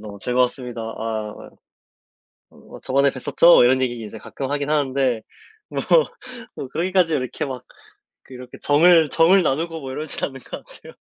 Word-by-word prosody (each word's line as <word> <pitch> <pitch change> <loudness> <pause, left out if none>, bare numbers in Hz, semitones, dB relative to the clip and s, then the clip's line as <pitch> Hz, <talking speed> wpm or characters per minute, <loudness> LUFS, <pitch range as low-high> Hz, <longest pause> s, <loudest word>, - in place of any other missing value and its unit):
너무 105 -1 -9
즐거웠습니다. 125 +1 -1
아 110 -1 -6 1.0
어 - - -22
뭐 - - -14
저번에 140 +2 +2
뵀었죠?" 135 +3 +4
이런 130 +1 +3
얘기 120 -3 -3
이제 105 - -9
가끔 135 +4 -6
하긴 145 0 -2
하는데 135 -5 0 0.5
뭐 - - -3 0.7
뭐 135 - -7
그러기까지 175 +2 +1
이렇게 130 +2 -4
막 130 -3 -7 0.6
그렇게 125 -1 -12
정을 160 +1 +5
정을 180 +4 +4
나누고 165 +3 -1
뭐 135 -1 -7
이러진 150 +2 -5
않는 135 -1 -8
것 - - -10
같아요. - - -15
135 Hz, 330 characters per minute, -21 LUFS, 125-155 Hz, 1.0 s, 정을